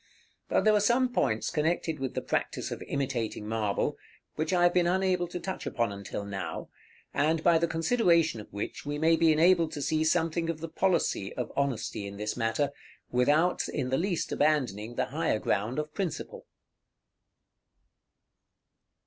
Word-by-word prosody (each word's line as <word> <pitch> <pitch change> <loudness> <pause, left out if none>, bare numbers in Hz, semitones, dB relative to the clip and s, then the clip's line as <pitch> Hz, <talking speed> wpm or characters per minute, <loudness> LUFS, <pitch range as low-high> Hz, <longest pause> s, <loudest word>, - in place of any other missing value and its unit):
But - - +2
there 215 - +5
are 210 - +4
some 245 +4 +2
points 110 - 0
connected 160 0 0
with 135 -1 -3
the - - -2
practice - - -2
of - - -5
imitating 125 -6 -2
marble, 110 -2 -1 0.3
which 155 +3 -2
I 180 -1 +3
have 175 0 +5
been 175 -1 +3
unable 185 -1 +1
to 175 +1 -5
touch 190 +2 -5
upon 115 -3 0
until 100 0 -6
now, 100 -1 -5 0.4
and 155 +2 +1
by 170 -2 +5
the 170 - +1
consideration 165 - +2
of - - -15
which 100 +1 -5
we 145 0 -3
may 160 +2 +4
be 165 -1 +4
enabled 165 0 +4
to 145 - -4
see 155 +3 +1
something 165 0 +1
of 165 -2 -2
the 165 +1 -5
policy 170 - 0
of 125 - -3
honesty 130 -7 -1
in 100 0 -8
this 105 +1 -3
matter, 115 +5 0 0.4
without 150 +8 +2
in 130 -4 -2
the 130 - +2
least 180 -1 -1
abandoning 120 -7 0
the - - +1
higher - - +1
ground 110 +6 -1
of 150 0 -3
principle. 190 -6 -4
155 Hz, 165 wpm, -29 LUFS, 120-175 Hz, 0.4 s, there